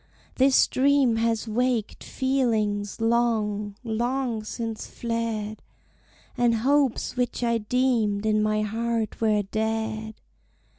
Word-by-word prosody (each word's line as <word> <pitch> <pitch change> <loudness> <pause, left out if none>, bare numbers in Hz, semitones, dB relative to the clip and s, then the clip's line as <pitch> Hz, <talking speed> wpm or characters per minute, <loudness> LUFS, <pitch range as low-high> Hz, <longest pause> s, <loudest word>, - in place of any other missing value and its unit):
This 265 0 +5
dream 270 -3 +3
has 225 0 0
waked 240 0 -1
feelings 220 -7 0
long, 220 -3 0
long 240 0 -1
since 225 +1 -5
fled, 230 -2 -3 0.7
And 240 -2 +2
hopes 270 +2 +1
which 245 0 -1
I 235 -1 +1
deemed 220 -3 +1
in 215 0 +2
my 215 0 +1
heart 225 +1 -2
were 215 -2 +2
dead! 220 +1 -3
225 Hz, 105 wpm, -25 LUFS, 215-245 Hz, 0.7 s, This